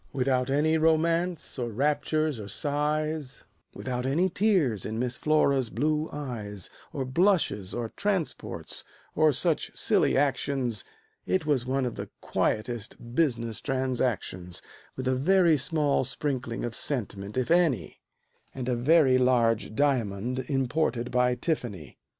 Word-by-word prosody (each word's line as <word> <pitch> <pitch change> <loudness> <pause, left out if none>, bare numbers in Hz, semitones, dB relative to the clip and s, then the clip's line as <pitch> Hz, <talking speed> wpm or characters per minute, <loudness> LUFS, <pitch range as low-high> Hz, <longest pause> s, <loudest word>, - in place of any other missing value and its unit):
Without 130 -1 +1
any 155 +3 +2
romance, 165 0 +1
or 120 -1 -1
raptures, 150 +3 0
or 105 - -7
sighs, 150 +3 -1 0.3
Without 125 -1 -3
any 155 +8 +2
tears 175 - +2
in 110 +1 -4
Miss 125 +1 -1
Flora's 140 -3 +2
blue 150 +6 0
eyes, 110 - -5 0.2
Or 135 - -3
blushes, 130 - +1
or 120 -2 -3
transports, 195 -6 -2 0.3
or 155 0 +4
such 155 +4 0
silly - - +3
actions, 135 -5 0 0.4
It 185 -4 +1
was 135 -5 +1
one 135 0 +1
of 120 - -2
the - - -5
quietest 120 +1 -2
business 115 -7 0
transactions, 125 - -2 0.3
With 130 0 -4
a 130 - +3
very 170 +5 +4
small 145 0 +1
sprinkling 130 -3 -3
of 120 - -4
sentiment, 105 -6 -3
if 130 +4 0
any, 155 - +2 0.5
And 130 -2 -4
a 125 - +1
very 130 +1 +4
large 115 -4 +2
diamond 125 -2 0
imported 130 -3 0
by 125 0 +3
Tiffany. 120 - -4
130 Hz, 130 wpm, -28 LUFS, 120-155 Hz, 0.5 s, or